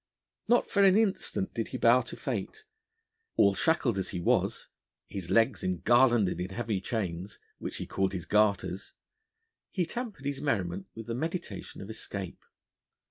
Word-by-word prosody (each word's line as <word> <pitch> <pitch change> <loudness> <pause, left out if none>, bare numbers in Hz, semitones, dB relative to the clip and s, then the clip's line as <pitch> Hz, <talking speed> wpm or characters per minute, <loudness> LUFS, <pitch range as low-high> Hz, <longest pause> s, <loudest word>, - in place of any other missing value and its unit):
Not 240 0 +4
for 200 - +3
an 195 0 +6
instant 215 -3 0
did - - -2
he - - -4
bow - - +5
to - - -8
fate: 435 0 -4 0.7
all 100 -1 +6
shackled 120 - +2
as 95 - -3
he 90 - -4
was, 85 - +1 0.4
his 95 -4 -6
legs 115 +4 +3
engarlanded 110 0 +3
in 90 - -3
heavy 105 -1 -2
chains 95 -2 -3 0.2
which - - -5
he - - -4
called 95 0 -1
his 90 -3 -4
garters 100 -3 +1 0.8
he 180 -3 0
tempered 215 - -5
his 140 -1 -2
merriment 95 -8 -1
with 115 - -7
the 115 - -3
meditation 155 - -4
of 100 - -8
escape. 100 -4 -6
105 Hz, 155 wpm, -30 LUFS, 95-140 Hz, 0.8 s, an